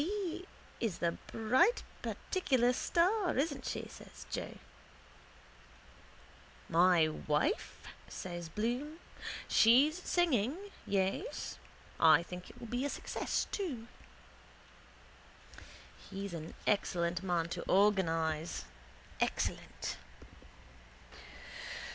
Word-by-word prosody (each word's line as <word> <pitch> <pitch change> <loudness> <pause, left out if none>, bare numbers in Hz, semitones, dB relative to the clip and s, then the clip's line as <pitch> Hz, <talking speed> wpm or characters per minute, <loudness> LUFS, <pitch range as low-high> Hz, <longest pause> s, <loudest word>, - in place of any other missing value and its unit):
—Mrs 380 +2 -1
B. 355 +3 -7 0.3
is 220 -7 -1
the 170 - +1 0.2
bright 260 - +3 0.2
particular 260 -10 +1
star, 360 - +2
isn't 285 0 0
she? - - -3
says - - -12
Joe. - - -4 2.1
—My 170 -1 +5
wife? 155 - -1 0.2
says 175 -2 -6
Bloom. 245 - -2 0.5
She's 280 +10 +5
singing, 300 - +2 0.3
yes. 195 - -1 0.4
I 160 0 +7
think 180 +1 -8
it 245 - -14
will 240 - -7
be 245 +3 -2
a 285 - 0
success - - -1
too. 275 - -3 2.2
He's 195 -1 -5
an 160 -1 -6
excellent 175 -4 +1
man 175 -3 0
to - - -3
organise. 165 -5 +2 0.5
Excellent. - - -1
220 Hz, 90 wpm, -34 LUFS, -, 2.2 s, I